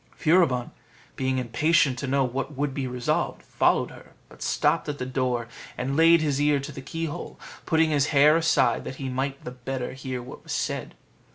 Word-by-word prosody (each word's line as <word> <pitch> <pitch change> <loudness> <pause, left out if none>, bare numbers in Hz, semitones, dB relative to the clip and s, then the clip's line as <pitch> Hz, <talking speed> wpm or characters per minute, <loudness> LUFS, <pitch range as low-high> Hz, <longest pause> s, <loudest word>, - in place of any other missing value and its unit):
Furibon, 155 -7 +3 0.4
being 130 0 0
impatient 130 +2 +2
to 140 - -3
know 135 +1 +2
what 135 +3 -3
would 145 -1 -1
be 135 -1 -2
resolved, 125 -1 -1
followed - - +1
her; - - -15 0.2
but - - -17
stopped - - +1
at 145 - -3
the 125 - -4
door, 125 -2 -1 0.3
and 135 +2 -2
laid 165 +1 +6
his 145 -2 0
ear 145 -1 +3
to 140 - -6
the - - -8
keyhole, 160 +2 -5 0.3
putting 160 -1 +3
his 145 -1 +2
hair 150 +1 +5
aside 165 0 +2
that 130 - -6
he 135 -1 -5
might 135 +2 -3
the 125 - -6
better 125 0 -5
hear 130 -1 -5
what 125 - -10
was - - -6
said. - - -3
135 Hz, 190 wpm, -26 LUFS, 130-150 Hz, 0.4 s, laid